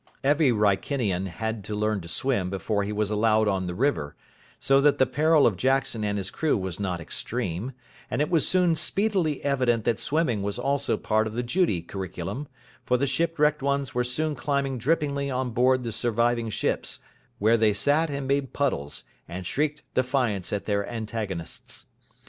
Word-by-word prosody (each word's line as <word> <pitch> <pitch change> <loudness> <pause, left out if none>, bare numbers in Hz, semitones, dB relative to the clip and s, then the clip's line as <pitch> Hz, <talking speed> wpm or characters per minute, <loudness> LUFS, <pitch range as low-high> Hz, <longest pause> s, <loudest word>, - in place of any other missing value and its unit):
Every 145 +1 +4
Wrykinian 105 -2 +1
had 110 +3 -4
to 105 - -4
learn 105 -1 0
to 85 - -10
swim 100 0 0
before 100 +2 -1
he 100 +1 -2
was 105 0 -1
allowed 110 0 +3
on 95 -2 0
the 90 - -4
river; 110 - 0 0.4
so 135 0 +3
that 145 0 +4
the 130 - +5
peril 150 +4 +3
of 110 - +3
Jackson 130 -2 +1
and 105 0 0
his 95 -1 -3
crew 160 -2 +1
was 95 -2 -4
not 90 -4 -2
extreme: 110 +5 -3 0.4
and - - -2
it 150 - 0
was 165 -4 +4
soon 180 -2 +3
speedily 165 -1 0
evident 125 -5 +2
that 115 -1 +1
swimming 125 -4 +1
was 100 0 -3
also 140 +3 0
part 110 0 +1
of 110 - -6
the 120 +2 -2
Judy 120 - +1
curriculum, 95 - -5 0.4
for 125 - +2
the 140 - +1
shipwrecked 150 +1 +1
ones 140 -1 -1
were 125 - +1
soon 150 +6 -1
climbing 135 -1 -1
drippingly 140 +1 0
on 130 -1 -1
board 125 +2 +3
the 115 - -3
surviving 115 0 0
ships, 105 - -2 0.4
where 110 +3 +4
they 110 -2 +4
sat 145 +10 +2
and 140 -1 -3
made 140 -1 0
puddles, 100 - -1 0.2
and 90 +2 -6
shrieked 150 +7 -1
defiance 125 -8 0
at 105 - -2
their 100 -1 0
antagonists. 110 -7 -5
120 Hz, 180 wpm, -26 LUFS, 105-140 Hz, 0.4 s, the